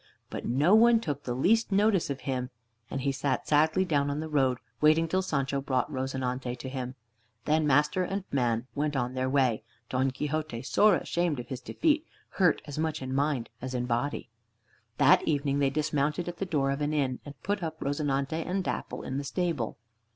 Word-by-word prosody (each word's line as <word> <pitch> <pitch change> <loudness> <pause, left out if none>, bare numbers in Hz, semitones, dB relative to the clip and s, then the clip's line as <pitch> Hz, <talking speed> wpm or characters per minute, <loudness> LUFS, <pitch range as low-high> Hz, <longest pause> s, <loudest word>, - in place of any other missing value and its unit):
But - - -5
no 145 - +3
one 230 +1 +7
took 145 -9 -4
the 120 - -2
least 220 - +2
notice 200 -3 +3
of 135 -2 -4
him, 125 -2 -2 0.4
and 135 - -3
he 140 +1 +1
sat 135 +1 -1
sadly 160 +5 +3
down 145 -5 +1
on 145 +1 -2
the 160 - -3
road, 135 -5 +2 0.2
waiting 155 +2 +5
till 185 +3 +1
Sancho 140 -6 -1
brought 135 +1 -1
"Rozinante" 130 -2 -2
to 130 +1 -7
him. 130 -1 -5 0.5
Then 155 0 +2
master 150 +6 +3
and 195 +2 -2
man 120 -3 +1
went 145 0 -1
on 125 -1 -1
their 130 0 -1
way, 130 -5 +2 0.3
Don 130 +1 +1
Quixote 150 -2 -3
sore 210 +8 +4
ashamed 170 -5 -1
of 120 +1 -7
his 130 -2 -5
defeat, 310 - +1 0.3
hurt 180 -5 +2
as 145 0 -6
much 160 -3 -1
in 130 0 -4
mind 140 -4 0
as 130 0 -4
in 125 0 -1
body. 120 +1 -2 0.7
That - - +6
evening 140 -2 +1
they 140 -1 +3
dismounted 150 +3 0
at 175 - -5
the 195 - -3
door 140 -5 +1
of 140 +2 -3
an 150 +1 0
inn, 130 -4 0
and 145 -1 -11
put 205 0 -1
up 160 -1 -4
"Rozinante" 145 +2 -1
and 190 +3 -1
"Dapple" - - -4
in 130 +1 -3
the - - -4
stable. 160 - -2
145 Hz, 195 wpm, -29 LUFS, 130-160 Hz, 0.7 s, one